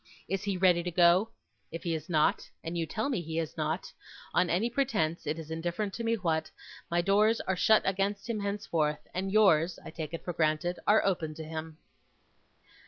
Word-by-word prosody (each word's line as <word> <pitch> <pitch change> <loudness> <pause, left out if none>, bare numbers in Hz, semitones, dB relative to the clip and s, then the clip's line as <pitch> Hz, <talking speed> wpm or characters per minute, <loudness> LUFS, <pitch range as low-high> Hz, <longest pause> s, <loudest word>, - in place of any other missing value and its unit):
Is 195 0 -1
he 200 -2 -2
ready 180 -2 +4
to 180 - -3
go? 175 +4 +4 0.4
If 165 - -6
he 170 - -1
is 160 +3 -5
not 155 -3 +2
and 165 +1 -4
you 165 -1 -1
tell 220 - -2
me 255 -10 -1
he 160 -1 -5
is 165 -2 -2
not; 160 +2 -3 0.4
on 180 - +3
any 190 +7 +2
pretence; 220 - -1
it 150 +2 -1
is 160 -1 -8
indifferent 175 +5 -2
to 235 - -4
me 230 0 +2
what 165 -6 -1 0.4
my 170 0 +2
doors 210 +5 +3
are 190 - -1
shut 215 +4 +4
against 195 +2 -1
him 230 -3 -2
henceforth, 170 -7 -1
and 190 +1 -2
yours, 185 -5 +4
I - - -7
take 160 -1 -5
it - - -9
for 175 - -3
granted, 160 +2 0
are 210 +1 +5
open 165 -5 -1
to 160 - -7
him. 160 0 -6
175 Hz, 200 wpm, -30 LUFS, 160-200 Hz, 0.4 s, are